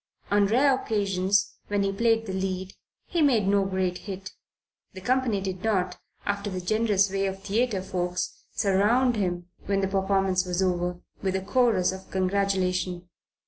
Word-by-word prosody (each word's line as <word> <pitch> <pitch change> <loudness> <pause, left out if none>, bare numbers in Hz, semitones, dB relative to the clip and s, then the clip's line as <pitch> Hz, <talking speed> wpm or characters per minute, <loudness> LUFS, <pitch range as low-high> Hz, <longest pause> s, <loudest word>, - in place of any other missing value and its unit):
On 205 0 +4
the 210 - -1
rare 270 +3 +5
occasions 200 -1 0
when 205 -1 +1
he 195 - +1
played 225 +2 +2
the 190 - -4
lead, 190 0 -3 0.3
he 345 - -1
made 240 -9 +3
no 200 0 +3
great 185 -2 -1
hit. 195 -1 -7 0.6
The 190 - -9
company 245 -1 +1
did 190 -1 -4
not, 185 -5 0 0.3
after 205 0 -1
the 185 -1 -3
generous 200 0 +2
way 195 0 0
of 195 0 -5
theatre 210 -1 0
folks, 180 -1 -3
surround 220 +6 +3
him, 175 -4 -2 0.2
when 195 0 +1
the 195 - +1
performance 195 -1 +1
was 180 -1 -2
over, 180 -1 -1 0.2
with 190 -1 -1
a 190 - 0
chorus 220 -4 +2
of 190 0 -9
congratulation. 185 -2 0
195 Hz, 165 wpm, -26 LUFS, 185-205 Hz, 0.6 s, rare